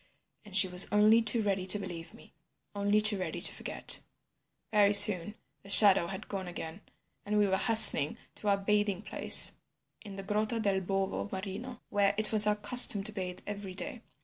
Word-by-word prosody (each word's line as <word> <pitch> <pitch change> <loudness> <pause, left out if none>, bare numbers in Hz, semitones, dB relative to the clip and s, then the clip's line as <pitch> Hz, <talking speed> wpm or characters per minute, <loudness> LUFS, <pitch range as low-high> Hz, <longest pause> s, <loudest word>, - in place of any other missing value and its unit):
And 205 -3 -6
she 190 -1 +1
was 180 +1 +5
only 215 +2 +1
too 225 0 -1
ready 195 -2 -5
to 200 - +3
believe 175 -4 -12
me, - - -22 0.4
only 205 +1 -3
too 210 -2 0
ready 185 - -8
to - - +1
forget. - - -4 0.7
"Very 205 -1 0
soon 200 -1 +4 0.3
the 200 - -19
shadow 200 -4 +4
had 190 +1 -11
gone 190 -2 -9
again, 175 +1 -11 0.4
and 210 +1 -5
we 205 -1 -1
were 190 - -3
hastening 220 - +6 0.2
to 210 - -12
our 200 -1 -1
bathing 205 0 -4
place 195 - +2 0.5
in 200 -3 -13
the 195 - -11
Grotta 215 +3 -5
del 200 -3 -4
Bovo 195 +2 -6
Marino, 205 +6 -10
where 200 0 -2
it 215 -1 +1
was 215 -1 +2
our 210 - -1
custom 210 -2 +3
to 215 - +2
bathe 185 -3 -9
every 200 -2 -11
day. 245 +4 -6
205 Hz, 185 wpm, -27 LUFS, 190-210 Hz, 0.7 s, hastening